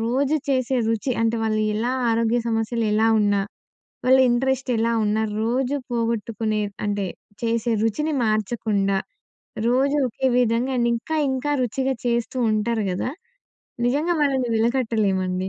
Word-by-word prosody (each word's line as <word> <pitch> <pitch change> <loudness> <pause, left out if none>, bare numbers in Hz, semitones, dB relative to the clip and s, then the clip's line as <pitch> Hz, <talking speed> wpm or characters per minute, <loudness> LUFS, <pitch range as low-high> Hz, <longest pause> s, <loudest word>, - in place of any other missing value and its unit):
రోజు 270 +6 +1
చేసే 260 -1 +1
రుచి 225 +3 0
అంటే 230 0 +1
వాళ్ళు 215 -1 0
ఎలా 235 +4 -1 0.2
ఆరోగ్య 230 +1 +1
సమస్యలు 225 +1 -1
ఎలా 220 +1 +3
ఉన్నా, 205 -1 +2 0.7
వాళ్ళ 260 +1 +6
ఇంట్రెస్ట్ 265 +1 0
ఎలా 230 +1 +1
ఉన్నా, 220 +1 +1 0.2
రోజు 255 +4 0 0.2
పోగొట్టుకునే 225 -2 -1 0.2
అంటే 205 -1 -1 0.4
చేసే 230 0 0
రుచిని 300 +8 0
మార్చకుండా, 210 -2 0 0.7
రోజు 275 +4 +2
ఒకే 260 +3 -1
విధంగా 245 +2 +1
అండ్ 235 0 +2
ఇంకా, 315 +7 -3
ఇంకా 265 +2 -2
రుచిగా 265 +3 -1
చేస్తూ 235 +1 -1
ఉంటారు 215 0 0
గదా! 190 +7 -2 0.8
నిజంగా 300 +7 +1
వాళ్ళని 265 -4 +1
విలకట్టలేమండి. 210 -6 0
230 Hz, 130 wpm, -23 LUFS, 215-255 Hz, 0.8 s, వాళ్ళ